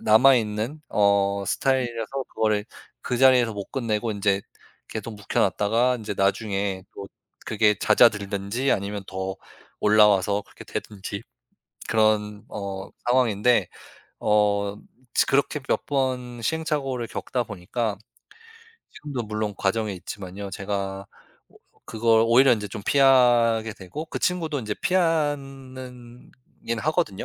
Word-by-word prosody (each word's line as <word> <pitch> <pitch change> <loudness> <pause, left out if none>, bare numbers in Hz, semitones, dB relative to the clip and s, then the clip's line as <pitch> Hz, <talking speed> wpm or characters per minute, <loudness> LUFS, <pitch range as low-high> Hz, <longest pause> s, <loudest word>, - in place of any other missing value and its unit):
남아 125 +5 +6
있는 110 +7 -2
어 100 -1 +2
스타일이라서 120 -1 0 0.2
그거를 105 -2 +1 0.4
그 125 - -2
자리에서 125 -3 +5
못 100 -2 -7
끝내고 115 -3 -1
인제 100 -1 +1 0.5
계속 110 +1 -6
묵혀 105 -1 -2
놨다가 115 +6 +2
인제 110 -2 -5
나중에 100 -1 0
또 100 - -7 0.4
그게 105 -1 +3
잦아들든지 105 +3 +2
아니면 100 0 -3
더 95 0 -4 0.4
올라와서 105 -1 +4
그렇게 - - -14
되든지. 100 -1 -6 0.7
그런 105 -1 +1
어 100 -1 -6 0.2
상황인데 120 -4 +3 0.5
어 100 -1 +1 0.4
츠 - - +3
그렇게 140 +2 +1
몇 - - 0
번 125 -3 -2
시행착오를 135 -4 -2
겪다 125 -2 -3
보니까 105 +1 -3 0.9
지금도 140 -5 -5
물론 105 -1 -3
과정에 105 +1 0
있지만요. 95 +1 -7
제가 100 0 -4 0.4
오 - - -22 0.3
그걸 115 0 +3
오히려 130 +4 +6
인제 105 -3 -1
좀 100 +1 -8
피하게 120 -5 +4
되고 100 - -7
그 - - -5
친구도 160 -5 -1
인제 105 -3 -3
피한 145 -7 0
는 125 -2 -11 0.3
인하거든요. 115 - -1
110 Hz, 275 characters per minute, -24 LUFS, 100-125 Hz, 0.9 s, 남아